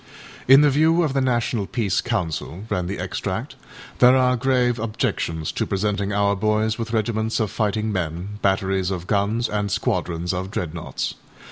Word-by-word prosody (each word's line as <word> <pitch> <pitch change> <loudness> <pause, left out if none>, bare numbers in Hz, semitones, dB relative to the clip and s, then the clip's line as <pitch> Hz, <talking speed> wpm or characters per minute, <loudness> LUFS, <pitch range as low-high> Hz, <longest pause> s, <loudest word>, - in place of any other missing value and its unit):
â 135 - +10
âIn 145 - +7
the 145 - +5
view 160 +4 +3
of 150 -4 0
the 135 - +1
National 120 -5 0
Peace 105 -6 0
Council,â 95 -2 -3
ran 90 -1 0
the 100 - -3
extract, - - -4 0.4
âthere 125 +1 +7
are 125 0 +3
grave 125 -1 +1
objections 85 -7 -2
to - - -2
presenting 100 0 -1
our 100 0 +2
boys 110 +2 0
with 115 0 -4
regiments 110 0 0
of 110 -3 -1
fighting 110 0 -1
men, 90 +2 -4
batteries 95 -1 +1
of 90 -3 -4
guns, 105 +4 +1
and 105 -1 -2
squadrons 90 -3 -1
of 95 +1 -3
âDreadnoughts. 85 -4 -4
105 Hz, 165 wpm, -22 LUFS, 95-120 Hz, 0.4 s, â